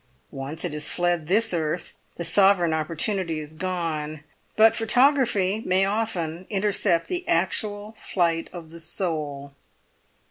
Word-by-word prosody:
Once 135 Hz, +4 st, -4 dB
it -, -, -3 dB
has 150 Hz, 0 st, +1 dB
fled 175 Hz, -3 st, 0 dB
this 220 Hz, +3 st, +2 dB
earth, 165 Hz, +1 st, -2 dB, 0.2 s
the 170 Hz, -, -4 dB
sovereign 175 Hz, -1 st, +4 dB
opportunity 165 Hz, +2 st, -1 dB
is 155 Hz, 0 st, -7 dB
gone; 155 Hz, -4 st, -3 dB, 0.3 s
but 220 Hz, +1 st, +6 dB
photography 225 Hz, -4 st, +3 dB
may 190 Hz, +1 st, +2 dB
often 185 Hz, -5 st, -2 dB
intercept 195 Hz, -4 st, +1 dB
the 360 Hz, 0 st, -4 dB
actual 205 Hz, +4 st, 0 dB
flight 170 Hz, -6 st, -1 dB
of 165 Hz, -3 st, -9 dB
the 170 Hz, -, -9 dB
soul." 155 Hz, -5 st, -4 dB
175 Hz, 130 wpm, -25 LUFS, 160-205 Hz, 0.3 s, but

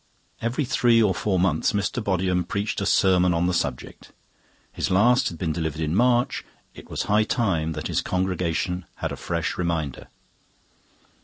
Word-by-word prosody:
Every 120 Hz, +5 st, -1 dB
three 120 Hz, -3 st, +3 dB
or 100 Hz, -3 st, +2 dB
four 95 Hz, +1 st, -1 dB
months 85 Hz, -4 st, +1 dB
Mr. 105 Hz, +4 st, -1 dB
Bodiham 90 Hz, -2 st, 0 dB
preached 100 Hz, +4 st, -3 dB
a 100 Hz, -, -1 dB
sermon 90 Hz, -3 st, +3 dB
on 85 Hz, +1 st, +1 dB
the 90 Hz, -, +1 dB
subject. 70 Hz, -6 st, -4 dB, 0.6 s
His -, -, -2 dB
last 115 Hz, +7 st, +4 dB
had 85 Hz, -, -9 dB
been 85 Hz, -2 st, -1 dB
delivered 80 Hz, -2 st, -3 dB
in 80 Hz, 0 st, -1 dB
March; 120 Hz, +3 st, +2 dB, 0.3 s
it -, -, -13 dB
was -, -, -2 dB
high 105 Hz, +1 st, +3 dB
time 90 Hz, -9 st, 0 dB
that 75 Hz, 0 st, -6 dB
his -, -, 0 dB
congregation 90 Hz, -1 st, -2 dB
had -, -, -4 dB
a -, -, -4 dB
fresh 85 Hz, 0 st, -3 dB
reminder. 80 Hz, -6 st, -2 dB
90 Hz, 165 wpm, -24 LUFS, 85-105 Hz, 0.6 s, last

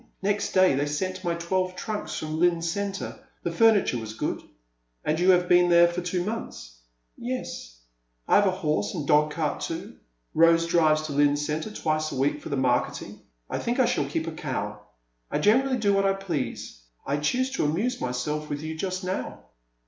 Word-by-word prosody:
Next 205 Hz, +1 st, 0 dB
day 185 Hz, -4 st, +5 dB
they 140 Hz, +2 st, 0 dB
sent 185 Hz, +6 st, -3 dB
my 170 Hz, -1 st, 0 dB
twelve 185 Hz, +2 st, -1 dB
trunks 210 Hz, +3 st, -4 dB
from 155 Hz, 0 st, -4 dB
Lynne 170 Hz, -1 st, +3 dB
Centre. 195 Hz, +3 st, -3 dB, 0.2 s
The 170 Hz, -, -1 dB
furniture 200 Hz, -, +3 dB
was 110 Hz, -1 st, -7 dB
good. -, -, -2 dB, 0.6 s
And 155 Hz, +2 st, +1 dB
you 180 Hz, +2 st, +3 dB
have 180 Hz, -1 st, +5 dB
been 175 Hz, 0 st, +5 dB
there 170 Hz, 0 st, +7 dB
for 175 Hz, +1 st, -3 dB
two 180 Hz, 0 st, -1 dB
months? 130 Hz, -, -6 dB, 0.4 s
Yes. 235 Hz, -, -5 dB, 0.5 s
I -, -, +5 dB
have 205 Hz, -, +4 dB
a -, -, +5 dB
horse 155 Hz, -, -1 dB
and 150 Hz, -, -3 dB
dog 150 Hz, +1 st, +4 dB
cart 150 Hz, -1 st, -2 dB
too. 165 Hz, -, -5 dB, 0.4 s
Rose 165 Hz, +1 st, +5 dB
drives 160 Hz, -3 st, +3 dB
to 155 Hz, -, -5 dB
Lynne 145 Hz, 0 st, +3 dB
Centre 150 Hz, +5 st, -2 dB
twice 155 Hz, -6 st, -1 dB
a -, -, -5 dB
week 140 Hz, +3 st, 0 dB
for -, -, -8 dB
the 140 Hz, -, -1 dB
mar 130 Hz, -2 st, +3 dB
keting. -, -, -9 dB, 0.3 s
I -, -, -3 dB
think -, -, -1 dB
I -, -, +5 dB
shall -, -, 0 dB
keep -, -, -2 dB
a -, -, -4 dB
cow -, -, -4 dB, 0.2 s
— -, -, -47 dB
I -, -, -1 dB
generally 255 Hz, +5 st, +3 dB
do 205 Hz, -4 st, +2 dB
what 195 Hz, 0 st, +2 dB
I 195 Hz, -, +3 dB
please. 165 Hz, -, -4 dB, 0.2 s
I 140 Hz, -, 0 dB
choose 255 Hz, -, 0 dB
to 270 Hz, -, 0 dB
amuse 205 Hz, +12 st, -1 dB
myself 140 Hz, +5 st, -2 dB
with 145 Hz, +1 st, -4 dB
you 160 Hz, 0 st, -4 dB
just 185 Hz, +3 st, -3 dB
now. 185 Hz, +1 st, -4 dB
170 Hz, 200 wpm, -26 LUFS, 150-190 Hz, 0.6 s, there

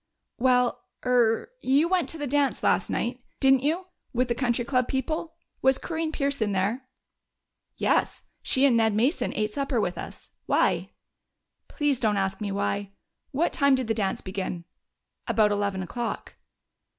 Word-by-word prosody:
"Well 250 Hz, -1 st, +3 dB, 0.2 s
er 245 Hz, -, +2 dB
you 280 Hz, +5 st, +3 dB
went 360 Hz, -1 st, +1 dB
to 325 Hz, -, -3 dB
that 290 Hz, -3 st, -3 dB
dance 285 Hz, -1 st, +1 dB
last -, -, +2 dB
night, 245 Hz, +2 st, -2 dB, 0.2 s
didn't 270 Hz, -1 st, +5 dB
you, 325 Hz, +7 st, 0 dB, 0.3 s
with 250 Hz, +1 st, +1 dB
the -, -, +3 dB
Country 240 Hz, -1 st, 0 dB
Club 255 Hz, -1 st, +1 dB
people? 315 Hz, +5 st, -2 dB, 0.3 s
Was 265 Hz, 0 st, +4 dB
Corinne 320 Hz, -1 st, -3 dB
Pearson 275 Hz, -9 st, -1 dB
there?" 215 Hz, +8 st, -1 dB, 0.9 s
"Yes, -, -, +1 dB, 0.2 s
she 265 Hz, +1 st, +3 dB
and 260 Hz, -4 st, +5 dB
Ned 220 Hz, -2 st, +3 dB
Mason 255 Hz, -, +1 dB
ate 215 Hz, 0 st, 0 dB
supper 275 Hz, -2 st, 0 dB
with 180 Hz, -4 st, -1 dB
us. -, -, -9 dB, 0.2 s
Why?" -, -, +2 dB, 0.8 s
"Please 290 Hz, -4 st, 0 dB
don't 215 Hz, -4 st, +1 dB
ask 195 Hz, +1 st, -1 dB
me 205 Hz, -1 st, -2 dB
why! 200 Hz, 0 st, -2 dB, 0.4 s
What 310 Hz, +5 st, 0 dB
time 280 Hz, -2 st, +4 dB
did 260 Hz, -1 st, -1 dB
the 225 Hz, -, 0 dB
dance 205 Hz, -3 st, -1 dB
begin?" 185 Hz, -2 st, -4 dB, 0.6 s
"About 215 Hz, -2 st, +3 dB
eleven 200 Hz, -2 st, -1 dB
o'clock." 235 Hz, +6 st, -4 dB
250 Hz, 155 wpm, -26 LUFS, 210-280 Hz, 0.9 s, didn't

